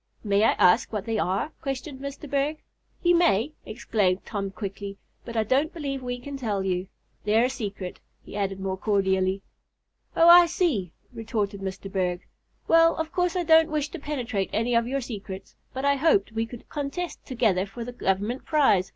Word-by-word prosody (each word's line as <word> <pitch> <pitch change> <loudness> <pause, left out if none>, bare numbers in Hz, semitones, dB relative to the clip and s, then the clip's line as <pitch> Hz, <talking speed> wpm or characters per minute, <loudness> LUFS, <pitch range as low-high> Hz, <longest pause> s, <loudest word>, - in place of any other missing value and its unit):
"May 200 -1 +2
I - - +5
ask 180 +7 +4
what 210 -2 -3
they 225 -2 -1
are?" 190 - 0
questioned 270 0 -4
Mr. 280 +2 -7
Berg. 285 +3 -1 0.4
"You 350 0 +5
may," 285 - +3
exclaimed 200 -3 0
Tom 200 -3 -3
quickly; 200 0 -6 0.3
"but 235 -1 -5
I 220 - +3
don't 275 +8 +1
believe 280 -5 -4
we 245 -1 -3
can 275 +3 -7
tell 210 -7 -1
you. 185 0 -1 0.4
They're 220 +3 +3
a 255 - 0
secret," 200 -7 -5 0.2
he - - -11
added 195 -2 -2
more 190 0 -2
cordially. 190 -1 +1 0.7
"Oh, 330 - +6
I 345 0 +9
see," 300 - 0 0.2
retorted 215 -3 -3
Mr. 195 0 -5
Berg. 180 -2 -1 0.4
"Well, 330 0 +5
of 320 0 -3
course 360 -1 0
I 360 - +1
don't 320 0 +6
wish 300 -1 -1
to 345 - -7
penetrate 245 -9 -2
any 230 +3 0
of 235 0 +3
your 275 +2 -1
secrets, 195 -5 -7 0.2
but 265 +1 -4
I 280 0 +3
hoped 270 -9 +3
we 225 +1 -2
could 240 0 -11
contest 295 +5 -4
together 215 -7 +1
for 235 +4 -7
the 245 - -6
Government 210 +2 -1
prize. 265 - +3
230 Hz, 185 wpm, -26 LUFS, 195-280 Hz, 0.7 s, I